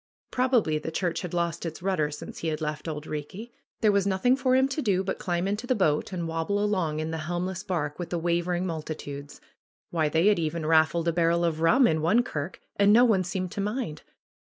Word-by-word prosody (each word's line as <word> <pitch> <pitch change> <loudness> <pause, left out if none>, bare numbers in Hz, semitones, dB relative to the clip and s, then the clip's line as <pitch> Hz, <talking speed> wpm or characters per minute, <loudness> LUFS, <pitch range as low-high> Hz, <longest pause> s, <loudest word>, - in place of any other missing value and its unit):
Probably 245 - +2
the 155 - -5
church 170 +1 -1
had 180 -3 -5
lost 170 -1 -1
its 165 0 -6
rudder 185 -6 +1
since 150 - -8
he 165 - -3
had 155 -1 -1
left 150 0 -4
Auld 150 -1 -4
Eeekie. 160 +10 -6 0.3
There 215 -2 +5
was 200 -1 +2
nothing 200 +7 +3
for 255 -1 +2
him 265 +1 +4
to 275 +3 -2
do 195 -6 +1
but 190 - -3
climb 175 +1 -1
into 210 +5 -2
the 255 - +2
boat 155 -7 +1
and 175 -3 -3
wob 165 0 -2
ble 205 - +1
along 185 -7 0
in 155 +1 -3
the 160 - -3
helmless 175 +3 -3
barque 165 -7 -3
with 175 - -4
the 175 - -1
wavering 175 +1 0
mul 165 -3 -3
titudes. 145 -2 -7 0.5
Why, 160 -3 +1
they 160 +4 +2
had 210 -3 +4
even 160 0 -2
raffled 160 +1 +3
a 170 - +2
barrel 170 0 +2
of 160 -1 -1
rum 245 +11 +5
in 160 -7 +2
one 215 +10 +3
kirk, 150 -5 -5 0.2
and 200 0 +5
no 240 +4 +7
one 205 -6 +3
seemed 185 0 -3
to 205 -1 -3
mind 210 - -3
175 Hz, 230 wpm, -27 LUFS, 160-200 Hz, 0.5 s, no